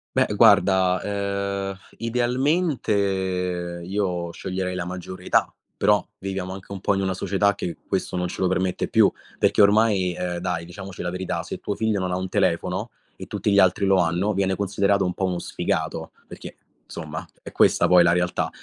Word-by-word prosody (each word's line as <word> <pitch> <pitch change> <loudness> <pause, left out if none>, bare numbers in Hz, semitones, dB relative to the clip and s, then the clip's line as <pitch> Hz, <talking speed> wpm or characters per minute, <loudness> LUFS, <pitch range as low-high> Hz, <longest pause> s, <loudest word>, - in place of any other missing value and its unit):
Beh - - +4
guarda, 95 -1 +5
ehm, 100 -1 -2 0.2
idealmente 125 +5 0 0.9
io 90 -2 -2
sceglierei 95 +1 -4
la 90 -1 -3
maggiore 90 +1 -7
età, - - +2 0.2
però - - +3
viviamo 95 -1 -4
anche 95 +1 -11
un 100 - -6
po' 100 - +1
in 95 - 0
una 95 -1 0
società 100 +2 +1
che 90 -4 -5
questo - - -2
non 90 0 -1
ce 85 - -6
lo 95 - +3
permette 95 0 0
più, - - +4 0.3
perché - - +3
ormai, 100 -3 +4
ehm, 90 -1 -3
dai 85 -2 -3
diciamoci 95 +1 -8
la 90 - -2
verità, 90 0 -3
se - - -6
tuo 105 - -3
figlio 110 -2 0
non 90 -1 -2
ha 90 - 0
un 95 0 -3
telefono 90 +4 0 0.3
e - - -9
tutti 105 - -1
gli 100 - +5
altri 95 +1 +4
lo 95 0 +4
hanno, 90 +5 +1
viene 95 -1 0
considerato 100 0 +1
un 90 - -1
po' 95 - -1
uno 90 -1 -1
sfigato, - - -3 0.2
perché - - -10 0.3
insomma 80 -1 -6 0.2
è - - -9
questa - - +4
poi 90 0 +7
la 85 0 +5
realtà. 90 0 0
95 Hz, 185 wpm, -24 LUFS, 90-100 Hz, 0.9 s, poi